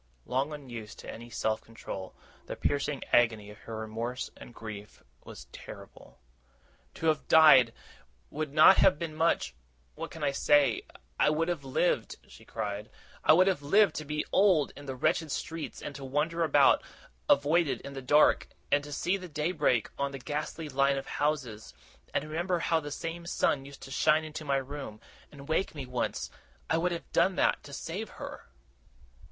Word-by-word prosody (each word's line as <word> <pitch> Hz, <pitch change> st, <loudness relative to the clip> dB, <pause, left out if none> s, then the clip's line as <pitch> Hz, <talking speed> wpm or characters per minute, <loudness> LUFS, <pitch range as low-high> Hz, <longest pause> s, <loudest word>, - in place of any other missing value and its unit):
Long 135 Hz, +4 st, -1 dB
unused 120 Hz, -8 st, -8 dB
to -, -, -8 dB
any 120 Hz, +1 st, -10 dB
self 110 Hz, 0 st, -1 dB
control, 95 Hz, -4 st, -8 dB, 0.3 s
the -, -, -5 dB
piercing 145 Hz, 0 st, -1 dB
agony 110 Hz, -4 st, +3 dB
of 105 Hz, -, -14 dB
her 115 Hz, -1 st, -7 dB
remorse 115 Hz, +4 st, -4 dB
and -, -, -12 dB
grief 105 Hz, -3 st, -9 dB, 0.2 s
was -, -, -10 dB
terrible. -, -, -12 dB, 0.8 s
'To -, -, -5 dB
have 155 Hz, -1 st, +1 dB
died, 150 Hz, -7 st, +7 dB, 0.6 s
would 155 Hz, -1 st, -3 dB
not 155 Hz, +5 st, +7 dB
have 190 Hz, -6 st, +5 dB
been 165 Hz, -1 st, -4 dB
much 160 Hz, -, +1 dB, 0.4 s
what -, -, -6 dB
can 160 Hz, -, -8 dB
I 140 Hz, -, +2 dB
say? 145 Hz, 0 st, +3 dB, 0.4 s
I -, -, +5 dB
would 160 Hz, +3 st, 0 dB
have 170 Hz, -5 st, -2 dB
lived!' 135 Hz, +6 st, 0 dB
she -, -, -15 dB
cried. 105 Hz, +1 st, -5 dB, 0.3 s
'I -, -, +7 dB
would 180 Hz, +3 st, +6 dB
have 190 Hz, -6 st, +1 dB
lived 195 Hz, +5 st, +4 dB
to 155 Hz, -, -3 dB
be 150 Hz, +1 st, -2 dB
old, 185 Hz, -8 st, +4 dB
in 145 Hz, 0 st, -11 dB
the 135 Hz, -, -4 dB
wretched 155 Hz, +3 st, 0 dB
streets 165 Hz, +2 st, -5 dB
and 145 Hz, -, -5 dB
to 140 Hz, -1 st, -9 dB
wander 150 Hz, +5 st, 0 dB
about, 145 Hz, -3 st, +5 dB, 0.5 s
avoided, 150 Hz, +2 st, +3 dB
in 140 Hz, -, -8 dB
the 135 Hz, -, -6 dB
dark 145 Hz, +4 st, +4 dB, 0.2 s
and 145 Hz, 0 st, +3 dB
to 145 Hz, -, -9 dB
see 175 Hz, +6 st, 0 dB
the 185 Hz, -2 st, -9 dB
day 150 Hz, +3 st, -1 dB
break 145 Hz, -, +1 dB
on 140 Hz, 0 st, 0 dB
the 135 Hz, -, -6 dB
ghastly 150 Hz, +3 st, -4 dB
line 140 Hz, 0 st, +2 dB
of 135 Hz, -, -4 dB
houses, 140 Hz, -8 st, -2 dB, 0.4 s
and -, -, 0 dB
remember 170 Hz, +4 st, -1 dB
how 165 Hz, -1 st, +1 dB
the 145 Hz, -2 st, -7 dB
same 165 Hz, +3 st, -5 dB
sun 135 Hz, -5 st, +1 dB
used 140 Hz, 0 st, -12 dB
to 135 Hz, -, -10 dB
shine 155 Hz, +3 st, +3 dB
into 155 Hz, 0 st, -7 dB
my 140 Hz, -2 st, +1 dB
room, 135 Hz, -5 st, -6 dB, 0.3 s
and 140 Hz, -1 st, -12 dB
wake 160 Hz, +2 st, 0 dB
me 140 Hz, -3 st, -5 dB
once 125 Hz, -1 st, -3 dB, 0.4 s
I 160 Hz, -, +3 dB
would 180 Hz, +2 st, 0 dB
have 170 Hz, -, -6 dB
done 190 Hz, -, +3 dB
even -, -, -10 dB
that, -, -, +2 dB
to 145 Hz, -, -12 dB
save 185 Hz, +9 st, -5 dB
her! -, -, -8 dB
145 Hz, 185 wpm, -29 LUFS, 130-160 Hz, 0.8 s, died